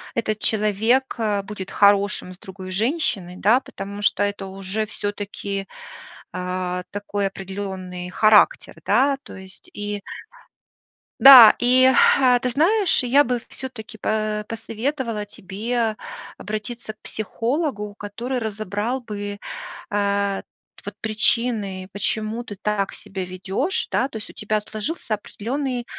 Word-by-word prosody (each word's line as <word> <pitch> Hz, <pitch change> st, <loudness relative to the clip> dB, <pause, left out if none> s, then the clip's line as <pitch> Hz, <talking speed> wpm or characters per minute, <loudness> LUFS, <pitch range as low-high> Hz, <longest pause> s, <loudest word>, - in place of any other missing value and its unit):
этот 215 Hz, -2 st, -1 dB
человек, 220 Hz, +5 st, +1 dB
э, 210 Hz, -3 st, +1 dB
будет 195 Hz, -2 st, -7 dB
хорошим 200 Hz, -2 st, +3 dB
с 180 Hz, -, -18 dB
другой 190 Hz, -1 st, -9 dB
женщиной, 210 Hz, -, 0 dB
да, 225 Hz, +6 st, +4 dB
потому 200 Hz, -4 st, -8 dB
что 205 Hz, -1 st, +3 dB
это 205 Hz, -1 st, -2 dB
уже 195 Hz, +3 st, -3 dB
всё-таки, 205 Hz, -1 st, -4 dB, 0.7 s
а, 180 Hz, 0 st, -3 dB
такой 205 Hz, 0 st, -2 dB
определённый 190 Hz, -2 st, -6 dB
характер, 215 Hz, -, +4 dB
да? 275 Hz, +1 st, +3 dB
То -, -, -11 dB
есть, 190 Hz, 0 st, -11 dB
и 205 Hz, 0 st, -4 dB, 1.2 s
да, 260 Hz, -5 st, +11 dB
и, 250 Hz, +1 st, +4 dB, 0.3 s
э, 250 Hz, -2 st, +4 dB
ты 250 Hz, -, -1 dB
знаешь, 350 Hz, -, +2 dB
я 275 Hz, +4 st, +4 dB
бы 245 Hz, -1 st, -1 dB
всё-таки, 235 Hz, -4 st, -8 dB
по 215 Hz, 0 st, -1 dB
посоветовала 230 Hz, 0 st, -3 dB
тебе 215 Hz, +3 st, -3 dB, 0.4 s
обратиться 215 Hz, +1 st, -5 dB
к 215 Hz, -, -41 dB
психологу, 225 Hz, -, -2 dB
который 235 Hz, +5 st, -4 dB
разобрал 215 Hz, +3 st, -3 dB
бы, 205 Hz, -3 st, -5 dB, 0.5 s
а, 200 Hz, -1 st, 0 dB, 0.4 s
вот 205 Hz, 0 st, -6 dB
причины, 215 Hz, -3 st, 0 dB
почему 215 Hz, +3 st, -2 dB
ты 205 Hz, -, -7 dB
так 210 Hz, -2 st, -1 dB
себя 190 Hz, -1 st, -6 dB
ведёшь, 190 Hz, -, -2 dB
да, -, -, +2 dB
то 270 Hz, -, -16 dB
есть 215 Hz, -, -6 dB
у -, -, -12 dB
тебя 215 Hz, 0 st, -1 dB
сложился 215 Hz, +3 st, -3 dB
определённый, 245 Hz, +4 st, -4 dB
210 Hz, 125 wpm, -22 LUFS, 200-240 Hz, 1.2 s, да